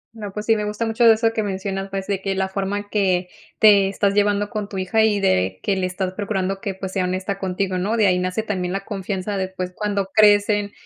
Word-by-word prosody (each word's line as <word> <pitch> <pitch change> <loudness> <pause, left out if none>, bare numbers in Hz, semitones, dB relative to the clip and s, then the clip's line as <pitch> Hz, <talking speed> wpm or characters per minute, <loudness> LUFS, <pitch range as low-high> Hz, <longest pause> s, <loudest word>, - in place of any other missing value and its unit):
No, 210 -3 -7
pues 210 +2 -6
sí, 225 - +4
me 210 - -2
gusta 210 +2 -2
mucho 225 +1 +1
eso 225 +1 +2
que 220 - 0
mencionas, 195 -1 -3
pues, 195 0 -4
de 195 -1 -2
que 195 0 -2
la 190 0 0
forma 195 +1 -2
en 205 - -5
que 185 -3 +1 0.3
te 200 -3 +6
estás 200 0 0
llevando 205 +1 +1
con 210 -3 -4
tu 195 - -6
hija 190 +4 +1
y 210 -2 +2
de 95 - +1
que 200 - +1
le 185 -1 -1
estás 185 0 -3
procurando 195 -1 -2
que, 200 -4 -4
pues, 190 0 -6
sea 190 -1 0
honesta 185 +2 -3
contigo, 185 0 -2
¿no? 210 +5 -1
De 215 - +4
ahí 180 -2 +3
nace 185 +4 -2
también 185 -4 -3
la 195 0 -4
confianza 195 -1 -3
de, 190 -1 -1
pues, 185 -1 -6
cuando 205 -2 -1
crecen 205 -1 +4
195 Hz, 245 wpm, -21 LUFS, 190-210 Hz, 0.3 s, te